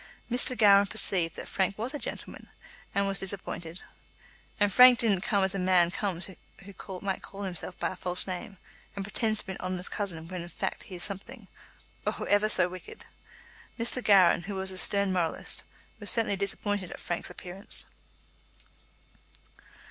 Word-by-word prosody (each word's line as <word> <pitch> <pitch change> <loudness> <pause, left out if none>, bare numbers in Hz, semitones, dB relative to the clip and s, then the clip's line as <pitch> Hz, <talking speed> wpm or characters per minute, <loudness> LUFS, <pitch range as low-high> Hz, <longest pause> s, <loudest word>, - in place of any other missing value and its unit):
Mr. 250 +1 +2
Gowran 200 -2 +6
perceived 185 -6 -1
that - - -7
Frank 195 0 0
was 235 +6 -3
a 295 - -3
gentleman, - - -6 0.5
and 200 0 +3
was 195 0 +1
disappointed. 180 -3 -6 0.8
And 205 -2 +3
Frank 250 +1 +9
didn't 205 -6 +2
come 200 0 +1
as 190 - +1
a 195 - -2
man 180 -2 +4
comes 185 -3 0 0.4
who 200 - -10
calls 190 +1 -9 0.4
himself 180 -1 -5
by - - -1
a 185 - -6
false 180 0 -4
name, 195 +2 -6 0.4
and 200 -1 -4
pretends 215 +1 0
to - - -15
be 190 - -5
an 190 - -7
honest 185 0 -3
cousin 170 -6 -3
when 180 0 -5
in 175 - -8
fact - - -4
he 185 - -7
is 175 - -2
something, 200 -1 -4 0.6
oh, - - -1
ever 205 +1 +3
so 180 - +5
wicked! 180 0 -10 0.7
Mr. 235 +1 -1
Gowran, 185 -4 +5
who 200 -1 -4
was 190 0 -1
a 185 - -7
stern 200 0 +1
moralist, 170 -3 -1 0.4
was 205 - +2
certainly 225 -4 +5
disappointed 200 -1 -2
at - - -8
Frank's 175 - -3
appearance. 185 +3 -2
195 Hz, 170 wpm, -29 LUFS, 180-205 Hz, 0.8 s, Frank